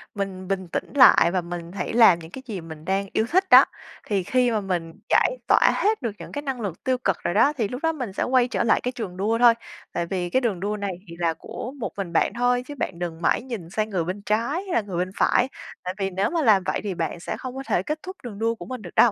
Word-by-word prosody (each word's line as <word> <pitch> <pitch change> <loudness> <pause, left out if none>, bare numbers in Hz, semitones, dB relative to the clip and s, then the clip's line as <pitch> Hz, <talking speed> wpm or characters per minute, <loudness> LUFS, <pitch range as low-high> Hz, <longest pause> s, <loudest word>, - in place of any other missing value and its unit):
mình 190 -2 -4
bình 190 -2 -2
tĩnh - - -4
lại 250 -10 +7
và 185 0 0
mình 170 0 -7
hãy 200 - -4
làm 220 -7 +7
những 160 0 -11
cái 265 - -8
gì 200 -7 -5
mình 160 -1 -10
đang 195 +1 0
yêu 220 - +2
thích 375 +2 +2
đó. - - +9 0.4
Thì 195 -3 0
khi 250 +3 +2
mà 215 -2 0
mình 175 -4 -3 0.2
giải - - +3
tỏa - - +5
hết 430 -2 +1
được 230 -4 -2
những - - -9
cái 290 - -4
năng 270 -4 -4
lực 190 -5 -5
tiêu 260 -1 +1
cực 195 -8 0
rồi 175 - 0
đó, 290 - +4
thì 220 - +1
lúc 250 +6 -6
đó 325 - +3
mình 250 -10 -5
sẽ - - -1
quay 250 -1 +3
trở - - -1
lại 230 - +3
cái 250 - -1
trường 215 -8 -6
đua 215 +4 +1
thôi. 240 -1 +7 0.4
Tại 170 - -1
vì 175 0 -3
cái 260 - +2
đường 215 -8 -1
đua 210 +2 -2
này 200 -1 -3 0.2
thì 170 - -9
là 165 -2 +1
của 250 +9 -7
một 230 - -3
mình 185 -4 -4
bạn - - +2
thôi 245 +1 +2
chứ 290 - -7
bạn 175 -9 -4
đừng 170 -1 -4
mãi - - +2
nhìn 230 -10 -7
sang 215 +3 -1
người 185 -5 -1
bên 185 +4 -4
trái 220 +4 +1
hay 380 -3 -5
là 235 - +3
người 195 -4 -6
bên 185 +1 -1
phải. 250 - +3 0.4
Tại 180 - -3
vì 195 -1 -1
nếu 195 +2 0
mà 330 0 0
làm 210 -8 +4
vậy - - 0
thì 200 - -2
bạn 165 +1 -3
sẽ - - -5
không 255 -1 -7
có 270 - -5
thể - - +1
kết 305 +1 -3
thúc 375 0 -7
đường 210 -4 -7
đua 230 +1 +1
của - - -9
mình 255 -2 -6
được 175 -4 -11
đâu. 235 - +6
205 Hz, 285 wpm, -24 LUFS, 180-250 Hz, 0.4 s, đó